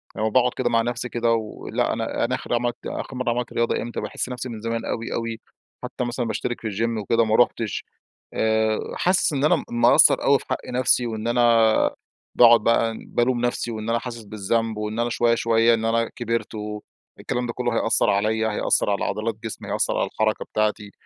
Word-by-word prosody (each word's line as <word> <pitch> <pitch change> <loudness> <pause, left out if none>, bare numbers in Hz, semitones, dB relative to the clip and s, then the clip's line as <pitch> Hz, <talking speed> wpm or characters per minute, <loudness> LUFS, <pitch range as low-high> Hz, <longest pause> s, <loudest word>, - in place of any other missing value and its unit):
لمّا 110 +1 0
باقعد 125 +2 +3
كده 125 -2 0
مع 115 -1 +3
نَفسي 120 +1 -3
كده 120 -1 0
ولأ 110 -2 -2
أنا - - -2
أنا - - -1
آخر - - -5
عملت 120 0 -1
آخر 130 - -5
مَرّة 125 -1 -1
عملت 120 0 -2
رياضة 115 0 0
إمتى؟ 120 - -5
باحس - - -4
نَفسي 125 0 -5
من 110 -2 -7
زمان 115 0 -3
أوي 115 +1 -3
أوي، 115 -1 -3 0.4
حتّى - - -4
مثلًا 120 0 -2
باشترك 115 +2 -3
في 110 - -4
الGym 110 +2 -1
وكده 115 +3 +2
ما 110 0 +1
رُحتش، 115 -3 +1 0.5
آآ، 110 0 +1 0.2
حاسس 180 -3 +2
إن 140 -1 -1
أنا 175 - +5
م 160 - -4
مقصّر 120 +1 +5
أوي 140 0 +4
في - - -13
حق 130 - 0
نَفسي، 125 -1 +2
وإن 110 0 -4
أنا 120 +1 +2 0.9
باقعد 120 -1 +7
بقى 115 0 +2
بالوم 120 0 0
نَفسي 120 -1 -2
وإن 110 0 -5
أنا 115 0 +1
حاسس 120 -1 -7
بالذنب، 110 +2 -2
وإن 105 +1 -4
أنا 120 0 +1
شوية 120 0 +2
شوية 115 0 +3
إن 110 -1 0
أنا 115 0 +1
كبرت 115 -1 -3
والكلام 105 +3 -6
ده 120 - -4
كلّه 120 -1 -2
هيأثر 115 - +2
عليَّ، 110 +2 +1
هيأثر 105 - +1
على 100 - 0
عضلات 110 +1 -2
جسمي، 110 - -6
هيأثر - - 0
على - - 0
الحركة 110 0 -1
بتاعتي، 105 -1 -1
115 Hz, 200 wpm, -23 LUFS, 110-120 Hz, 0.9 s, باقعد